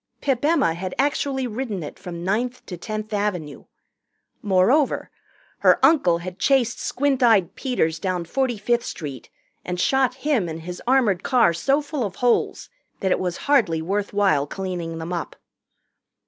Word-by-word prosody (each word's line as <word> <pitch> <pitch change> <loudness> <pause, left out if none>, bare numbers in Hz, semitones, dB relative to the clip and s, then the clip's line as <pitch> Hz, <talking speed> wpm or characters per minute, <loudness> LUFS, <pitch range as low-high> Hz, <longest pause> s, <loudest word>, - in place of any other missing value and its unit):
Pip 270 -3 -1
Emma 290 - +3
had 185 +2 -5
actually 275 -1 0
ridden 220 -6 -4
it 145 - -9
from 170 -1 -7
Ninth 240 +7 -1
to 180 - -6
Tenth 215 +4 -5
Avenue. 180 -9 -2 0.8
Moreover 210 +9 +2 0.5
her - - +5
uncle 270 - +4
had 180 +2 -8
chased 255 -1 +2
Squint 275 0 0
Eyed 220 -8 +4
Peters 165 - -1
down 185 -3 -2
Forty 255 +5 -1
fifth 240 +3 0
Street 145 - -7 0.3
and 180 0 -4
shot 260 +3 +2
him 245 - +1
and 160 0 -6
his 180 +1 -7
armored 240 -8 +3
car 235 -9 +3
so 275 - +1
full 290 -3 -3
of 195 -3 -4
holes 245 +1 +1 0.3
that 190 - 0
it - - +2
was 180 -2 -2
hardly 230 - +3
worth 195 +5 -2
while 190 -9 +2
cleaning 175 -2 -4
them 165 +2 -5
up. 170 - -4
205 Hz, 160 wpm, -23 LUFS, 175-255 Hz, 0.8 s, her